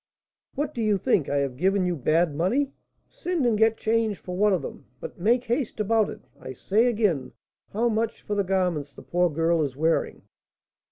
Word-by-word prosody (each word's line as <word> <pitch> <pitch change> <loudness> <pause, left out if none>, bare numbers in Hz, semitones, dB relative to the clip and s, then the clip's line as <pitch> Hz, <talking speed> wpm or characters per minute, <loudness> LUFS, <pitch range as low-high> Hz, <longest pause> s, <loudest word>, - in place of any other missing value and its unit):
"What! 295 +1 -2
do 235 - -3
you 210 -2 +2
think 175 -4 +1
I 145 - -1
have 140 -3 -1
given 190 +4 +2
you 180 -1 0
bad 160 +3 +1
money? 235 - 0 0.4
Send 350 -6 -2
and 235 -2 +3
get 225 +1 +3
change 220 -2 0
for 180 +1 -7
one 210 +2 +3
of 185 - 0
them; - - -8
but - - -9
make 235 +7 +2
haste 240 -1 -2
about 215 0 +2
it. - - -9 0.2
I 130 - -8
say, 210 - +1
again, 205 - 0 0.4
how 230 +4 +1
much 225 0 -1
for 210 - -3
the 205 -1 +1
garments 180 -7 -1
the - - -12
poor 175 0 +1
girl 165 +1 +1
is 140 -4 -2
wearing?" 160 +3 0
200 Hz, 200 wpm, -25 LUFS, 165-225 Hz, 0.4 s, and